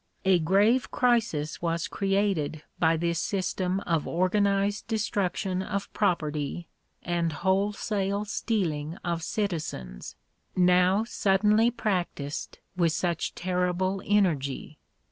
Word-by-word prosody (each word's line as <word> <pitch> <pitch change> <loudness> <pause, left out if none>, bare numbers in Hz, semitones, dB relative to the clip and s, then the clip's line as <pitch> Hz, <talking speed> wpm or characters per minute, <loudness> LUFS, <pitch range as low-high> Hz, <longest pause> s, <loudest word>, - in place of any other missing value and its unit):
A 190 -2 +5
grave 205 +9 +3
crisis 225 -12 +1
was 170 -1 -1
created 195 -7 0 0.2
by 165 0 +3
this 170 0 0
system 185 -1 -1
of 165 -5 -1
organized 200 +3 +1
destruction 195 -4 -1
of 200 +1 -4
property 155 -4 -1 0.4
and 170 -1 0
wholesale 200 +3 0
stealing 175 -8 -2
of 170 -1 -1
citizens, 160 - -4 0.4
now 180 +3 +4
suddenly 210 +1 +3
practised 180 -11 -3 0.2
with 170 -3 +2
such 175 -1 -1
terrible 185 +1 0
energy. 155 -8 0
185 Hz, 100 wpm, -27 LUFS, 165-200 Hz, 0.4 s, A